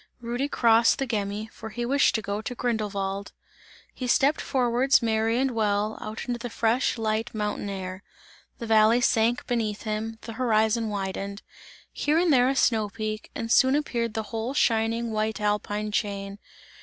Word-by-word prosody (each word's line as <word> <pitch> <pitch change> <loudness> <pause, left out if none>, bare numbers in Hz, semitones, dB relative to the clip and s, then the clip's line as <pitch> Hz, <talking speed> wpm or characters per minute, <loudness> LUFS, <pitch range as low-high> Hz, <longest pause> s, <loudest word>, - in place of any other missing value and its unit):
Rudy 240 +3 -2
crossed 230 -4 +4
the 270 - -1
Gemmi, 210 -3 -2
for 220 - -9
he 240 +2 -4
wished 275 +3 +3
to 220 - -1
go 200 +1 -3
to 245 +3 -5
Grindelwald. 200 -4 -2 0.6
He 255 - -5
stepped 275 +5 +3
forwards 255 +1 +2
merry 225 0 +1
and 265 +1 +1
well, 215 -1 0
out 215 +1 -6
into 240 -1 -3
the 245 +1 -5
fresh, 235 +4 +1
light 220 +1 -2
mountain 210 -1 -2
air. 185 -1 -5 0.6
The 235 - -6
valley 220 +1 +5
sank 235 0 +2
beneath 220 -4 -2
him, 220 +1 -3
the 225 - -7
horizon 220 -1 +1
widened; 200 0 -4 0.5
here 300 +2 +1
and 340 -2 +3
there 250 -1 +4
a 270 - 0
snow 220 -5 +2
peak, 215 0 -5
and 230 0 -4
soon 260 +2 +5
appeared 235 -6 -1
the 220 - -1
whole 225 +4 -3
shining 230 -1 +1
white 215 +1 -1
alpine 210 0 -1
chain. 200 -1 -3
225 Hz, 170 wpm, -26 LUFS, 210-240 Hz, 0.6 s, valley